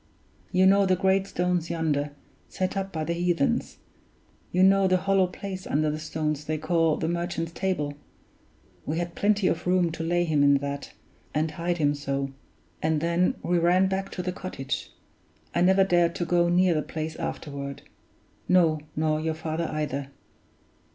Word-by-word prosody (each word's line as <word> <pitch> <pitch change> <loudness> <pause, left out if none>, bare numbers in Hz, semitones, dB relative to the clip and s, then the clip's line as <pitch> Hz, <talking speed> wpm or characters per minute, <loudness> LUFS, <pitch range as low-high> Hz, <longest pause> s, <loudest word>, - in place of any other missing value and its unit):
You 185 0 +4
know 195 +1 +5
the 185 - +4
great 190 +1 +2
stones 180 -2 -1
yonder, 155 -3 0 0.4
set 185 +1 -2
up 195 0 -2
by 160 -3 -3
the 170 +2 -1
heathens; 170 -3 0 0.7
you 180 +1 +3
know 195 0 +5
the 185 0 +3
hollow 195 0 +2
place 190 +1 -7
under 150 +1 +1
the 155 - -4
stones 155 -1 -3
they 155 0 -1
call 165 -1 +1
'The 160 - -2
Merchant's 170 -1 -2
Table'; 165 -6 -2 0.9
we 155 - -3
had 175 0 -3
plenty 205 0 +1
of 165 - -1
room 180 -2 +3
to 165 - -6
lay 175 +2 +1
him 155 -4 +1
in 140 0 +6
that, 140 0 -4 0.4
and 155 +1 +1
hide 170 +2 -2
him 145 -2 +2
so; 140 -1 -3 0.5
and 155 -1 +1
then 170 +3 +1
we 175 0 +2
ran 180 +3 +4
back 190 +1 -2
to 180 - -4
the 180 - -1
cottage. 135 -8 -5 0.6
I - - +1
never 190 +2 +5
dared 175 -2 +2
to 175 - -2
go 175 0 +2
near 180 0 +4
the 155 - +1
place 155 +1 -5
afterward; 140 -2 -5 0.7
no, 170 -4 +4 0.2
nor 155 0 +1
your 160 0 -1
father 160 +1 -3
either! 145 -3 -2
170 Hz, 170 wpm, -26 LUFS, 155-185 Hz, 0.9 s, in